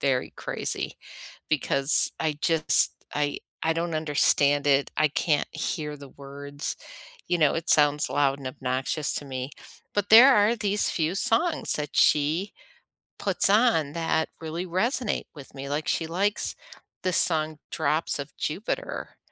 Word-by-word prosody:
very 130 -2 0
crazy - - -4 0.5
because 140 -1 +2
I 155 -2 -2
just, 165 -4 +3 0.2
I 145 -1 -1 0.2
I 160 - +1
don't 165 0 -3
understand 145 -2 +2
it. 140 0 +2
I 155 0 +3
can't 150 +1 0
hear 150 -2 -4
the 140 -1 -13
words, 140 +1 -6 0.5
you 175 - +1
know, 150 -3 +3
it 165 0 -4
sounds 150 -1 +5
loud 140 -1 +1
and 135 - -9
obnoxious 130 +3 -2
to 145 - -4
me, 130 0 -6 0.4
but 205 0 -1
there 250 +4 +9
are 210 +3 +3
these 205 -1 0
few 160 +1 -1
songs 315 - +1
that 150 -1 -4
she 155 +7 +2 0.7
puts - - +3
on 205 - +3
that 160 -1 -1
really 165 +3 -5
resonate 215 - -1
with 140 -2 -12
me. 135 +1 -7
Like, 145 +2 -3
she 160 - -1
likes 200 +5 -1 0.5
the 185 - 0
song 155 -3 +2
Drops 155 0 0
of 140 +1 -8
Jupiter. 215 - -4
155 Hz, 145 wpm, -25 LUFS, 145-180 Hz, 0.7 s, there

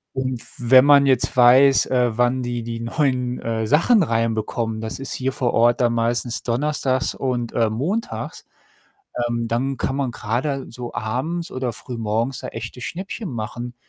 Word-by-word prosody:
Und 130 -2 -2
f - - -12
wenn 130 +2 +6
man 140 -1 +6
jetzt 130 -1 +1
weiß, 130 +3 +6
äh, 125 -3 +1
wann 125 +1 +2
die 120 -1 -3
die 115 0 -5
neuen, 125 -1 -1
äh, 115 -1 -2
Sachen 170 - +4
reinbekommen, 115 -2 -1
das 110 +3 -5
ist 135 - -5
hier 135 +1 -1
vor 125 -2 -1
Ort 120 +1 +3
dann 120 -1 +2
meistens 120 +1 -1
donnerstags 130 +1 0
und, 120 -3 -2
äh, 115 -2 +2
montags, 175 - -3 0.8
ähm, 115 -1 -2
dann 130 +4 -1
kann 135 - -2
man 135 -3 -1
grade 130 +6 -2
so 120 0 -7
abends 130 +11 -3
oder 130 -2 -2
frühmorgens 115 +2 -3
da - - -6
echte 125 - -7
Schnäppchen 185 - -5
machen 120 +2 -5
125 Hz, 165 wpm, -22 LUFS, 115-135 Hz, 0.8 s, wenn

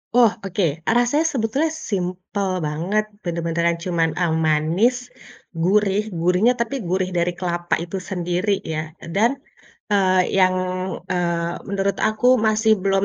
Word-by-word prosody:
Oh, 240 -2 +7 0.2
oke. 195 +1 -2 0.3
E - - +4
rasanya 245 +7 +2
sebetulnya 270 +6 0
simpel 195 - -3 0.2
banget, 180 +8 -1 0.2
bener-beneran 170 0 0
cuman 170 -2 +1
e - - +3 0.2
manis, 160 +11 +2 0.6
gurih 200 +4 +1
gurihnya 180 +8 +3
tapi 235 +3 -2
gurih 185 0 0
dari 175 +1 +1
kelapa 175 -1 -3
itu 175 +3 -5
sendiri 180 +2 -1
ya, 155 0 -5
e - - -9
dan, 225 +5 +4 0.6
eee, 185 -2 +3
yang, 185 -1 +4 0.6
eee, 170 -1 -1 0.2
menurut 200 0 0
aku 245 +3 +3
masih 220 0 +3
belum 195 0 +2
185 Hz, 135 wpm, -21 LUFS, 170-215 Hz, 0.6 s, Oh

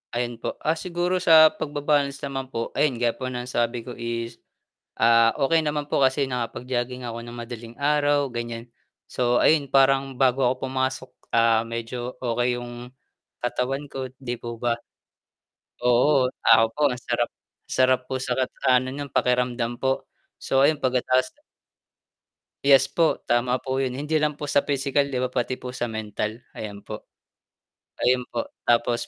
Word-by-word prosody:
Ayun 120 -1 -2
po, - - -4
ah, 155 - +2
siguro 180 0 -1
sa 160 -2 +7
pagba-balance 145 -1 -1
naman 135 -1 -4
po, 115 -3 -4
ayun 140 -5 +1
gaya 120 0 +1
ang 130 -1 -4
sabi 120 -1 -1
ko 125 - -8
is, 115 0 -5 0.6
ah, 115 0 +5 0.2
"okey 165 +1 +3
naman 150 -1 -2
po 140 - 0
kasi 135 +1 +3
nakapag-jogging 125 0 -3
ako 115 0 -5
ng 120 0 -9
madaling 120 0 -8
araw" 145 0 +2
gan'yan. 120 -1 -5 0.4
So, 120 -1 +1
ayun 145 -4 +3
parang 135 -1 +3
bago 130 0 +3
ako 130 +1 +1
pumasok, 130 0 -2 0.2
ah, 115 -1 +4
medyo, 115 +2 -5
okey 120 0 0
yung 120 0 -8 0.5
katawan 130 +4 -2
ko, 130 -2 -6
'di 125 -3 -4
po 120 -1 -6
ba. 120 0 +1 1.1
Oo, 125 +2 +4 0.2
ako 115 0 +6
po 150 - -8
masarap, 125 0 -2 0.4
sarap 130 0 +3
po 130 - -1
sa 125 -1 -2
kat 130 0 -1 0.2
ano 130 0 +3
nung 140 +1 -6
pakiramdam 125 -1 0
po, 135 0 0 0.4
so, 135 - +1 0.2
pagka-ta's 130 0 +1 1.4
Yes 135 -1 +6
po, 165 -2 +1
tama 125 +1 +1
po 130 0 -2
yun 130 -2 -1
hindi 150 +4 -1
lang 150 0 +1
po 145 0 -6
sa 140 - +2
pisikal, 140 0 +1
'di 135 -3 -3
ba, 130 - 0
pati 125 0 -2
po 125 - -6
sa 125 -1 -3
mental. 110 0 -4 0.2
Ayan 100 -2 -7
po, - - -8 1.0
ayun 125 0 +2
po, - - -3 0.2
tapos 120 0 +2
125 Hz, 155 wpm, -24 LUFS, 120-135 Hz, 1.4 s, sa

